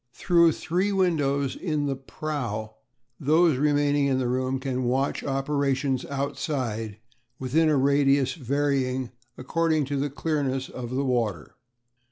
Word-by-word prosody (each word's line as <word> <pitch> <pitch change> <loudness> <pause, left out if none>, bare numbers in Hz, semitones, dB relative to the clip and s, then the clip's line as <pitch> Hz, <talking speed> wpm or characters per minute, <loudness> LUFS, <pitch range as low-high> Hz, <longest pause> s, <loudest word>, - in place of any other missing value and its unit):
Through 170 -3 +4
three 185 +5 -1
windows 145 -8 +1
in 155 -5 -2
the 140 -1 -1
prow 125 -6 -4 0.5
those 155 +1 +3
remaining 145 0 +2
in 135 -1 +1
the 130 -1 0
room 130 +1 -1
can 130 -1 -2
watch 130 +3 0
operations 135 -1 0
outside 130 - -3 0.4
within 155 +5 +2
a 150 - +3
radius 140 -1 +3
varying 135 -3 -1 0.3
according 155 +3 0
to 140 +1 -2
the 145 +1 -1
clearness 140 -3 -2
of 120 -2 -6
the 135 +3 -1
water. 115 - -1
140 Hz, 130 wpm, -26 LUFS, 130-150 Hz, 0.5 s, Through